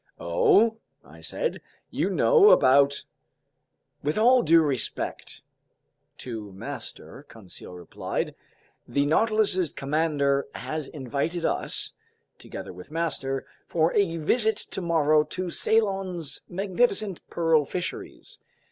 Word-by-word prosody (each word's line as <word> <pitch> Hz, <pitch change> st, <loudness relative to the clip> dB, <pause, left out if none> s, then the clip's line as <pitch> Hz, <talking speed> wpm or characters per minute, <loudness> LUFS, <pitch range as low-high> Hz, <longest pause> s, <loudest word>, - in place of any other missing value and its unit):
"Oh!" 205 Hz, -, +3 dB, 0.3 s
I -, -, -15 dB
said. -, -, -3 dB, 0.3 s
"You -, -, 0 dB
know 450 Hz, -4 st, +5 dB
about—" 140 Hz, -, +4 dB, 1.0 s
"With 150 Hz, +5 st, -1 dB
all 245 Hz, +3 st, +5 dB
due 165 Hz, -2 st, +5 dB
respect 135 Hz, -6 st, -3 dB, 0.7 s
to 110 Hz, -5 st, -7 dB
master," 95 Hz, -, -8 dB
Conseil 95 Hz, -4 st, -11 dB
replied, 90 Hz, -1 st, -4 dB, 0.5 s
"the 140 Hz, 0 st, +1 dB
Nautilus's 200 Hz, 0 st, +2 dB
commander 140 Hz, -1 st, 0 dB
has 155 Hz, -2 st, -4 dB
invited 150 Hz, +5 st, -3 dB
us, -, -, -2 dB, 0.5 s
together -, -, -8 dB
with 90 Hz, +7 st, -12 dB
master, 150 Hz, -5 st, -2 dB, 0.2 s
for 165 Hz, 0 st, +1 dB
a 180 Hz, -5 st, +1 dB
visit 220 Hz, +8 st, +2 dB
tomorrow 155 Hz, -4 st, +1 dB
to 180 Hz, +3 st, -5 dB
Ceylon's 195 Hz, -8 st, 0 dB
magnificent 200 Hz, +1 st, 0 dB
pearl 165 Hz, -2 st, +2 dB
fisheries. 180 Hz, +5 st, -6 dB
165 Hz, 105 wpm, -26 LUFS, 140-195 Hz, 1.0 s, know